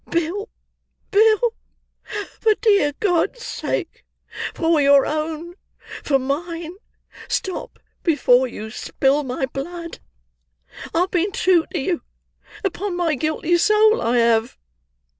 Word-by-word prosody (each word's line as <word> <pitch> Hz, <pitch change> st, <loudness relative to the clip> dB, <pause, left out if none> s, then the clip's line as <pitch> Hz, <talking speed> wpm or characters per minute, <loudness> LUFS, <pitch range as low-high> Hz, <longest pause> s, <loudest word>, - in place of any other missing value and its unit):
Bill, 345 Hz, +6 st, -1 dB, 0.6 s
Bill, 440 Hz, +2 st, +4 dB, 0.9 s
for 435 Hz, -2 st, +3 dB
dear 400 Hz, -11 st, +3 dB
God's 415 Hz, +4 st, 0 dB
sake, -, -, -4 dB, 0.5 s
for 325 Hz, -2 st, +2 dB
your 280 Hz, -1 st, +6 dB
own, 315 Hz, +2 st, -3 dB, 0.5 s
for 275 Hz, -, +3 dB
mine, 325 Hz, +5 st, -3 dB, 0.5 s
stop 375 Hz, -, -3 dB, 0.2 s
before 260 Hz, -6 st, +3 dB
you 220 Hz, -2 st, -8 dB
spill 270 Hz, +4 st, 0 dB
my 265 Hz, -1 st, -2 dB
blood! 335 Hz, +6 st, -7 dB, 0.9 s
I 330 Hz, -, +1 dB
have 370 Hz, -, 0 dB
been 370 Hz, +2 st, +1 dB
true 360 Hz, -3 st, +2 dB
to 360 Hz, -, -2 dB
you, 340 Hz, +5 st, -1 dB, 0.6 s
upon 390 Hz, -1 st, -2 dB
my 340 Hz, -3 st, +1 dB
guilty 315 Hz, +4 st, 0 dB
soul 430 Hz, +3 st, +4 dB
I 240 Hz, +2 st, +1 dB
have!" 230 Hz, 0 st, +2 dB
335 Hz, 115 wpm, -21 LUFS, 280-380 Hz, 0.9 s, your